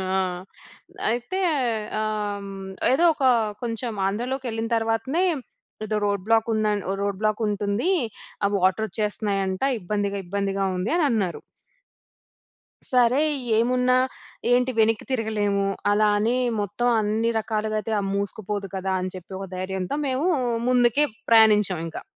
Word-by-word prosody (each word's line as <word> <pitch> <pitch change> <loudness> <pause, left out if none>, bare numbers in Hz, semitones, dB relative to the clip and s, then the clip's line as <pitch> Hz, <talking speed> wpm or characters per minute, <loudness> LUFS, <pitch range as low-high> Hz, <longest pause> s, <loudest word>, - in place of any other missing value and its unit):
ఆ! - - +2 0.9
అయితే 240 +11 -2 0.6
ఆహ్, 210 -1 -2
హ్మ్. 195 -1 -8 0.3
ఏదో 320 +6 +3
ఒక 280 - -3 0.4
కొంచెం 235 0 -2
ఆంధ్రలోకెళ్ళిన 230 +2 -2
తరువాతనే 225 +9 0 0.6
ఏదో 215 0 -1
రోడ్ 200 -2 -1
బ్లాక్ 225 0 +3
ఉం 220 - +1 0.4
రోడ్ 200 -1 -2
బ్లాక్ 215 +1 +1
ఉంటుంది. 205 - 0 0.5
ఆ - - +5
వాటర్ 190 +4 +2
వచ్చేస్తున్నాయంటా 205 +2 -1
ఇబ్బందిగా 200 +1 -2
ఇబ్బందిగా 195 +1 -1
ఉంది 180 +4 -2
అనన్నారు. 225 - +1 1.5
సరే 250 +1 +4 0.4
ఏమున్నా 250 +2 +3 0.6
ఏంటి 250 +1 +3
వెనక్కి 220 -1 +3
తిరగలేము. 210 -5 0 0.3
అలా 210 +1 +3
అని 225 +4 +1 0.2
మొత్తం 205 +5 -1
అన్ని 215 +2 0
రకాలుగాయితే 215 0 -2 0.2
మూసుకుపోదు 200 0 -3
కదా! 190 0 -1
అని 185 0 -3
చెప్పి 185 +1 -11
ఒక 195 - -6
ధైర్యంతో 185 +5 -3
మేము 265 +5 0 0.4
ముందుకే 250 +3 +4 0.3
ప్రయాణించాం 210 -5 +5
ఇంకా. 165 - -7
215 Hz, 115 wpm, -24 LUFS, 200-235 Hz, 1.5 s, ఆ